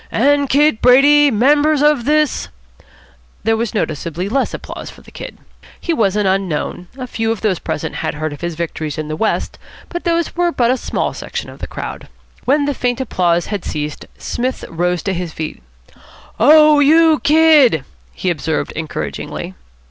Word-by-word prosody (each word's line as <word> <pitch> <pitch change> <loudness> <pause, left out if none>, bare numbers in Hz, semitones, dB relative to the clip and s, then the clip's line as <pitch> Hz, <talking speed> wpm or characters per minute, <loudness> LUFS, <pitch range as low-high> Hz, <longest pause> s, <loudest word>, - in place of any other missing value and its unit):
" - - -28
and 285 +3 +2
Kid 290 -4 +3
Brady, 285 +4 +6
members 290 +5 +3
of 295 -5 +3
this 305 0 +1 0.5
" - - -30
There 225 +1 +2
was 230 0 -3
noticeably 170 0 -3
less 270 +4 0
applause - - -7
for - - -14
the - - -16
Kid. - - -9 0.4
He 340 - -1
was 205 -9 +1
an 210 -1 +1
unknown. 185 -2 -1
A 255 - -5
few 225 -2 -2
of 225 - -3
those 195 -6 0
present 155 +1 -4
had 160 0 -3
heard 155 0 -3
of 145 - -11
his 170 -1 -3
victories 155 -2 -4
in 155 -1 -4
the 155 - -3
West, 215 +7 -2 0.3
but 345 - -5
these 340 -1 0
were 350 0 +1
but 240 -6 +2
a 260 - +1
small - - -2
section - - -6
of - - -14
the - - -6
crowd. - - -7 0.4
When 285 +3 +2
the 285 - 0
faint 245 -1 -1
applause 175 -9 0
had 200 - -3
ceased, 150 0 -5
Psmith 255 +2 -3
rose 175 +1 -1
to 195 - -1
his 175 -3 -4
feet. 155 - -6 0.8
"Oh, 305 0 +7
you 315 +2 +5
Kid!" 295 - +4 0.3
he 185 - -2
observed 160 -1 -2
encouragingly. 160 -1 -5
225 Hz, 180 wpm, -17 LUFS, -, 0.8 s, Oh